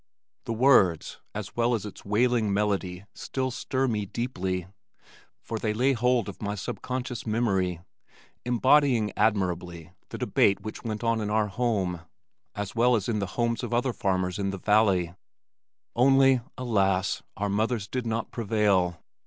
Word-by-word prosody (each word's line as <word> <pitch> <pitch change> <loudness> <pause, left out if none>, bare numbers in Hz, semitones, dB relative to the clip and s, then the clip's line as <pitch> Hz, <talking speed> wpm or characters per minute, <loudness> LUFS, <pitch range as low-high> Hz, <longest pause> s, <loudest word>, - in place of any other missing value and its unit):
The 115 - -2
words 110 - +3 0.2
as 105 -1 -6
well 120 +1 +2
as 110 - -4
its 105 - -9
wailing 110 +1 +1
melody 100 -2 -1
still 130 -1 -3
stir 130 +2 -1
me 105 -4 -1
deeply, 95 -6 -3 0.7
for 115 - -5
they 105 -1 -1
lay 130 +4 +3
hold 125 -1 +1
of - - -8
my 105 -1 -2
sub 100 - -5
conscious 125 -2 -4
memory 95 -6 0 0.6
embodying 125 -2 +3
admirably 90 -5 -1 0.2
the - - -6
debate 100 0 +2
which 110 +2 -7
went 110 -1 -4
on 115 -1 +1
in 105 - -2
our 105 0 +1
home 95 -6 -1 0.5
as 100 -1 -4
well 120 +1 +4
as 105 -4 -1
in 110 -3 0
the 100 - -2
homes 115 -1 0
of 120 - -2
other 125 +1 +1
farmers 95 -1 -1
in 100 -1 0
the 95 - -4
valley, 95 -4 +2 0.8
only, 135 0 +5 0.2
alas! 100 -6 +1 0.2
our 105 - -1
mothers 110 +1 0
did 125 0 -3
not 115 0 -2
prevail. 100 -6 +1
110 Hz, 155 wpm, -27 LUFS, 95-120 Hz, 0.8 s, only